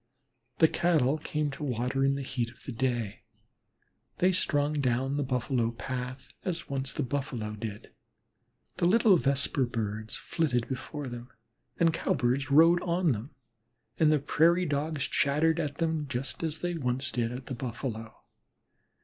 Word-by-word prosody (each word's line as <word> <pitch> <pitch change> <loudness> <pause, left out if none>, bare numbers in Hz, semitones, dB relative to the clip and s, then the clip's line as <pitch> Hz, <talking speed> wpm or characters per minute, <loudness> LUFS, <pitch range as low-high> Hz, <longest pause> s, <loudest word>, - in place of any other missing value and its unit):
The 160 - +6
Cattle 155 -4 +2
came 150 -1 -2
to 140 - -7
water 125 0 0
in 135 0 +3
the 140 - -3
heat 125 -3 -2
of 120 - -18
the - - -5
day. 120 -4 -2 1.0
They 185 +1 +4
strung 145 -4 +1
down 130 +1 +1
the 145 - 0
Buffalo 125 -2 0
path 125 +2 -6
as 170 -2 -3
once 135 -1 -1
the 150 - -2
Buffalo 125 -5 -3
did. 105 -1 -7 0.8
The 170 - +3
little 215 0 +6
Vesper 140 -3 +2
birds 110 -2 -3
flitted 135 -8 -1
before 140 +2 -5
them, 120 0 -7 0.5
the 170 - +3
Cowbirds 135 -3 0
rode 165 +4 +6
on 175 -2 +1
them, 115 +4 -5 0.6
and 155 -1 +5
the 155 - +5
Prairie 165 +5 +3
dogs 150 -1 -1
chattered 155 +5 +2
at 145 -3 -2
them, 160 -2 -1
just 130 -2 -4
as 160 -1 0
they 175 0 -1
once 130 -4 -1
did 120 -1 -1
at 125 +1 -6
the 130 - -5
Buffalo. 115 -2 -5
135 Hz, 155 wpm, -29 LUFS, 125-155 Hz, 1.0 s, The